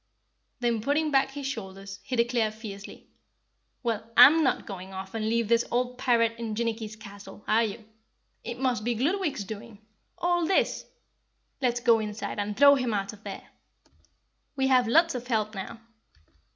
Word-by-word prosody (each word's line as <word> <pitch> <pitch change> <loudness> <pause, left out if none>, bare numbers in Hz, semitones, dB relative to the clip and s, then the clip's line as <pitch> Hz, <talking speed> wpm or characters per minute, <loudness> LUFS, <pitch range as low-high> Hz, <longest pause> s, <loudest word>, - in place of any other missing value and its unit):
Then 235 -2 +1
putting 295 +5 0
back 270 -1 +3
his 280 0 -7
shoulders, 195 -6 -6
he 255 - -4
declared 235 -2 +1
fiercely, 205 -3 -10 0.8
"Well, 225 -2 -2
I'M 300 +7 +9
not 265 - 0
going 190 -2 -8
off 190 +1 -7
and 220 -1 -2
leave 230 -1 +1
this 235 +1 +3
old 250 +1 -1
pirate 230 -2 +2
in 225 -2 -4
Jinnicky's 225 -1 -3
castle, 205 -1 -12
are 225 +2 +3
you? 220 0 -5 0.6
It 235 +1 -5
must 250 -4 0
be 240 +1 0
Gludwig's 300 - -1
doing 220 +2 -9 0.4
all 350 -1 +1
this! 385 - +1 0.7
Let's 245 -2 +1
go 235 -2 +4
inside 210 -1 -4
and 205 0 -3
throw 280 +1 +8
him 250 -5 0
out 195 +1 -3
of 210 - -16
there! - - -8 1.1
We 265 -1 +1
have 250 -3 +4
lots 330 +7 +4
of 250 -1 -6
help 215 -3 0
now. 195 +3 -7
230 Hz, 165 wpm, -27 LUFS, 215-255 Hz, 1.1 s, I'M